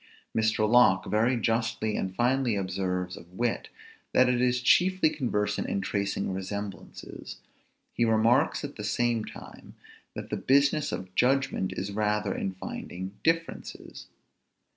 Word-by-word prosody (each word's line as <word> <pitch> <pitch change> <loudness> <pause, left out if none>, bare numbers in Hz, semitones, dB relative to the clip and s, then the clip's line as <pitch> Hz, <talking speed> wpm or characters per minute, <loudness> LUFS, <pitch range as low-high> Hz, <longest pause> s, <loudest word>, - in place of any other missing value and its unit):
Mr. 110 -1 +2
Locke 115 -5 +5
very 115 +4 +2
justly 115 -2 0
and 95 0 -3
finely 125 0 +2
observes 95 -1 -2
of 85 - -14
wit, 120 +4 -2 0.4
that 130 - +5
it 125 -1 +2
is 125 0 +2
chiefly 180 +4 +4
conversant 105 -7 -1
in - - 0
tracing 100 0 -2
resemblances; 100 +1 -7 0.6
he 120 - +1
remarks, 115 +6 +3
at 145 0 -6
the 105 - -6
same 120 +1 0
time, - - -11 0.4
that - - -7
the - - -1
business 140 +2 +2
of 90 0 -6
judgment 130 -4 +1
is 95 +2 -4
rather 105 0 0
in 95 - -3
finding 95 0 -6
differences. 165 0 -2
110 Hz, 135 wpm, -28 LUFS, 100-125 Hz, 0.6 s, Locke